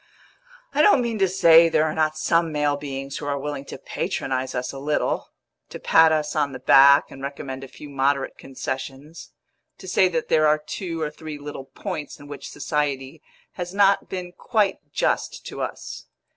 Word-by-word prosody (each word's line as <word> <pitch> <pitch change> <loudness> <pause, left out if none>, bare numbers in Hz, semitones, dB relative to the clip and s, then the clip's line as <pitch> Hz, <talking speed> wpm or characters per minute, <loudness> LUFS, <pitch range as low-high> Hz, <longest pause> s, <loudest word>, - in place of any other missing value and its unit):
I - - +3
don't 285 -12 +5
mean 230 -2 -2
to 195 - +4
say 170 -2 +6
there 155 - +3
are 155 -1 0
not 155 -1 0
some 165 +1 +1
male 150 -1 +1
beings 140 -1 -5
who 145 - -6
are 140 0 -1
willing 140 0 -5
to - - -8
patronise 130 0 -3
us 125 0 -2
a 135 - -8
little; 150 +2 -1 0.4
to - - -8
pat 160 0 +5
us 155 -1 0
on 145 -3 0
the 130 - -7
back 140 +2 +6
and 135 - -10
recommend 135 -1 -6
a - - -7
few 150 - -12
moderate 140 0 0
concessions; 135 +3 -7 0.5
to 190 - -12
say 185 +1 +4
that 165 -3 -2
there 155 -1 +4
are 150 0 +4
two 165 +2 -5
or 150 -1 -2
three 155 0 -8
little 145 -2 -8
points 170 -1 -6
in 145 - -12
which 145 -1 -8
society 145 -1 -2 0.3
has 180 +1 -6
not 200 -1 +3
been 180 -1 -5
quite 205 +1 0
just - - -1
to - - -6
us. - - -6
150 Hz, 185 wpm, -23 LUFS, 140-165 Hz, 0.5 s, say